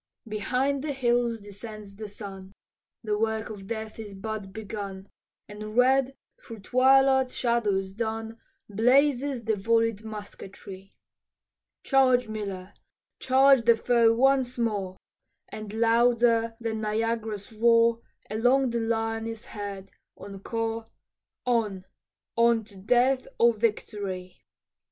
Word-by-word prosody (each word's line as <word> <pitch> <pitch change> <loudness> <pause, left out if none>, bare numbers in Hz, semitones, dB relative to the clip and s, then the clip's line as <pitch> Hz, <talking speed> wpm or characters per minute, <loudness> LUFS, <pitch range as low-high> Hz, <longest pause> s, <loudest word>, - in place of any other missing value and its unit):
Behind 250 +6 -1
the 300 -2 -2
hills 240 -3 +1
descends 205 0 -10
the 215 +1 -7
sun, 195 -2 -9 0.5
The 210 -1 -1
work 220 0 -1
of 195 -2 -9
death 220 0 -6
is 205 -3 -8
but 205 0 -6
begun, 200 -2 -7 0.4
And 215 +1 -8
red 265 +1 +3 0.3
through 225 -3 -10
twilight's 265 +3 +4
shadows 205 -6 0
dun 225 +1 -4 0.3
Blazes 255 +4 +2
the 220 - 0
vollied 225 +1 +1
musketry. 200 -2 -10 0.9
"Charge, 255 -3 +3
Miller, 200 -3 -6 0.5
charge 265 0 +5
the 230 0 +5
foe 230 0 +3
once 260 0 +2
more," 205 -5 -2 0.5
And 215 -1 -7
louder 230 0 +3
than 225 -2 -3
Niagara's 220 -1 -2
roar 230 +1 +4 0.3
Along 245 +4 +2
the 235 - -1
line 225 0 -1
is 225 0 -7
heard, 200 -2 -7 0.3
encore, 225 +3 -4 0.6
"On, 215 -6 0 0.5
on 235 -1 +3
to 205 -1 -16
death 250 +7 +2
or 235 0 +5
victory." 205 -4 -3
225 Hz, 115 wpm, -27 LUFS, 205-240 Hz, 0.9 s, charge